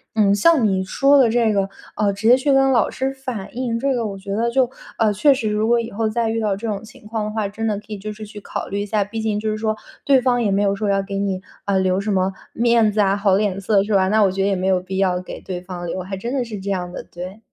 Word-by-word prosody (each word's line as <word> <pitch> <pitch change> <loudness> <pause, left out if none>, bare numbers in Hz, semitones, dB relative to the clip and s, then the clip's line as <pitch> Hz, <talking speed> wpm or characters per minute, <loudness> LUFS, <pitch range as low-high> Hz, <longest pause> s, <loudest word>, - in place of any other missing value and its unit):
嗯， 205 -2 +4
像 250 +1 +4
你 190 -1 0
说 275 +9 +3
的 250 -4 +5
这 230 -2 +2
个， 195 -1 0 0.3
啊， 205 -1 +1
直 205 +3 -2
接 245 - +8
去 270 +2 +1
跟 270 0 +4
老 230 - +3
师 265 +1 -2
反 255 -6 -6
映， 240 -2 -1
这 275 +1 +1
个 235 -2 -1
我 200 -2 -4
觉 195 +1 -6
得 235 +2 0
就 255 0 +2 0.3
啊， 220 -2 +2
确 280 +8 +5
实 225 -5 -2
如 210 +1 0
果 235 0 +4
以 230 - -4
后 220 +1 -1
再 230 +1 0
遇 225 0 -1
到 205 -3 0
这 225 +3 -5
种 205 -1 -3
情 225 +1 -15
况 220 -1 -2
的 210 - -3
话， 215 -2 -1
真 220 +3 -5
的 210 - 0
可 210 - -19
以 210 - -5
就 210 +2 -6
是 215 0 -8
去 210 0 -10
考 - - -5
虑 200 +1 -2
一 - - -2
下， 205 -1 0
毕 225 +2 -5
竟 215 -1 -1
就 215 0 -2
是 215 - -1
说 215 0 -1 0.3
对 275 -2 +5
方 245 -1 +1
也 205 - +1
没 195 +1 +2
有 200 -1 +2
说 205 +1 -2
要 195 0 +2
给 195 0 -5
你， 195 -2 -1 0.2
啊， 200 -1 +1
留 190 0 +1
什 210 +1 -2
么 190 0 +1 0.2
面 230 -2 +3
子 210 - -2
啊 195 -1 +3
好 200 -2 +3
脸 200 -2 0
色， 200 0 +3
是 215 - -2
吧？ 190 -1 +3
那 215 +2 +3
我 195 - +3
觉 195 +1 -2
得 195 - +2
也 195 - +1
没 185 +1 -1
有 185 -1 +2
必 190 +1 -5
要 185 -2 +1
给 185 - -8
对 180 -2 -6
方 180 -1 -7
留， 185 - -3
还 190 +1 -5
真 235 +6 -4
的 265 -3 0
是 220 -3 -6
这 195 +1 -5
样 180 -2 -3
的， - - -6
对。 185 +4 -8
210 Hz, 330 characters per minute, -21 LUFS, 195-230 Hz, 0.3 s, 接